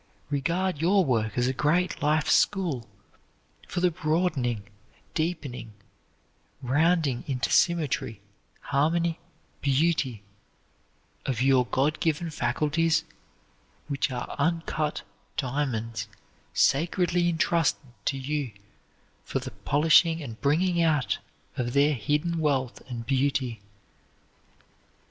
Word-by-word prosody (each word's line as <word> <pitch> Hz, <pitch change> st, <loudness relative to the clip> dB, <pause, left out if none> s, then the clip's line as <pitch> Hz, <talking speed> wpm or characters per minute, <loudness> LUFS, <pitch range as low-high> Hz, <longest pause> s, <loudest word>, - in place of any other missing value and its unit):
Regard 170 Hz, +3 st, 0 dB
your 190 Hz, +2 st, +4 dB
work 110 Hz, -5 st, 0 dB
as 120 Hz, -, +2 dB
a 130 Hz, -, +1 dB
great 150 Hz, +7 st, +1 dB
life 150 Hz, +1 st, +2 dB
school 165 Hz, -, +2 dB, 0.8 s
for 175 Hz, -, -3 dB
the 180 Hz, -1 st, +3 dB
broadening, 155 Hz, -, 0 dB, 0.5 s
deepening, 150 Hz, -9 st, -3 dB, 0.9 s
rounding 145 Hz, 0 st, +2 dB
into 130 Hz, -3 st, -1 dB
symmetry, 155 Hz, -, +1 dB, 0.4 s
harmony, 165 Hz, +4 st, +1 dB, 0.4 s
beauty, 140 Hz, -6 st, +1 dB, 1.0 s
of 125 Hz, -4 st, -1 dB
your 130 Hz, -1 st, +4 dB
God 140 Hz, +8 st, +1 dB
given 165 Hz, 0 st, 0 dB
faculties, 155 Hz, +2 st, +1 dB, 0.8 s
which 140 Hz, -1 st, 0 dB
are 125 Hz, -2 st, -5 dB
uncut 160 Hz, -1 st, -1 dB, 0.3 s
diamonds 125 Hz, -6 st, -2 dB, 0.4 s
sacredly 175 Hz, +3 st, +2 dB
intrusted 165 Hz, -5 st, +1 dB
to 135 Hz, -, 0 dB
you 135 Hz, -2 st, -3 dB, 0.7 s
for -, -, -3 dB
the -, -, -5 dB
polishing 160 Hz, +3 st, +4 dB
and 120 Hz, -8 st, -8 dB
bringing 170 Hz, +5 st, +2 dB
out 155 Hz, -5 st, +2 dB, 0.4 s
of 120 Hz, -1 st, -2 dB
their 145 Hz, +2 st, +4 dB
hidden 150 Hz, +8 st, 0 dB
wealth 135 Hz, -5 st, 0 dB
and 120 Hz, -2 st, -5 dB
beauty. 130 Hz, -3 st, 0 dB
150 Hz, 100 wpm, -27 LUFS, 130-165 Hz, 1.0 s, your